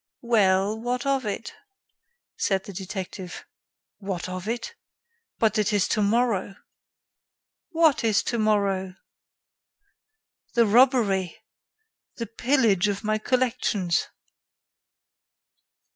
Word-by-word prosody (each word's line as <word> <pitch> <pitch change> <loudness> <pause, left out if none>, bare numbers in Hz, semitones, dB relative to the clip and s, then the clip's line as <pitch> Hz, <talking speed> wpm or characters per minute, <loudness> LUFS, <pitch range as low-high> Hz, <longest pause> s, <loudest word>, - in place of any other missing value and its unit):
"Well, 205 -2 +2
what 245 +3 -2
of 270 -4 0
it?" 210 +3 -4 0.8
said 195 -2 0
the 200 - -9
detective. 190 -1 -7 0.5
"What 195 -4 -4
of 185 +1 -6
it? 240 - -3 0.6
But 220 -1 +2
it 210 0 +1
is 205 -2 +2
tomorrow." 210 -2 +1 1.1
"What 320 -6 +3
is 220 -3 +2
tomorrow?" 200 -5 0 1.6
"The 235 -1 +5
robbery! 215 -6 +3 0.8
The 230 - -4
pillage 225 -4 +2
of 200 -1 -3
my 215 0 0
collections!" 235 -7 0
210 Hz, 90 wpm, -25 LUFS, 195-235 Hz, 1.6 s, The